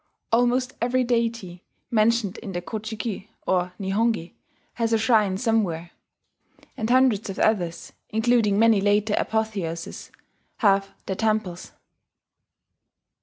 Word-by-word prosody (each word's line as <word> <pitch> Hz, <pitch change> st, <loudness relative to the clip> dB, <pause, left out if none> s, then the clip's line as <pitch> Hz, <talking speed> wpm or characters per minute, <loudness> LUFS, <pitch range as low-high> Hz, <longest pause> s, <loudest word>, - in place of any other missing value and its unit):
Almost 245 Hz, +2 st, +2 dB
every 250 Hz, +2 st, +2 dB
deity 230 Hz, -7 st, -2 dB, 0.3 s
mentioned 220 Hz, -2 st, +2 dB
in 200 Hz, -5 st, -7 dB
the 175 Hz, -, -3 dB
Ko 215 Hz, +6 st, -4 dB
ji 220 Hz, +1 st, -6 dB
ki 210 Hz, -2 st, -5 dB, 0.2 s
or 180 Hz, -1 st, 0 dB
Nihongi 200 Hz, -2 st, 0 dB, 0.4 s
has 230 Hz, -1 st, -1 dB
a -, -, +5 dB
shrine 215 Hz, -4 st, +2 dB
somewhere; 195 Hz, -8 st, 0 dB, 0.8 s
and 220 Hz, -, -3 dB
hundreds 250 Hz, -5 st, +3 dB
of 195 Hz, -, -5 dB
others 175 Hz, -6 st, 0 dB, 0.2 s
including 220 Hz, -2 st, +2 dB
many 225 Hz, -2 st, +5 dB
later 205 Hz, +1 st, +2 dB
apotheoses 200 Hz, -7 st, -3 dB, 0.5 s
have 195 Hz, -2 st, +3 dB, 0.2 s
their 190 Hz, -, -2 dB
temples. 215 Hz, -4 st, -2 dB
215 Hz, 120 wpm, -24 LUFS, 190-230 Hz, 0.8 s, a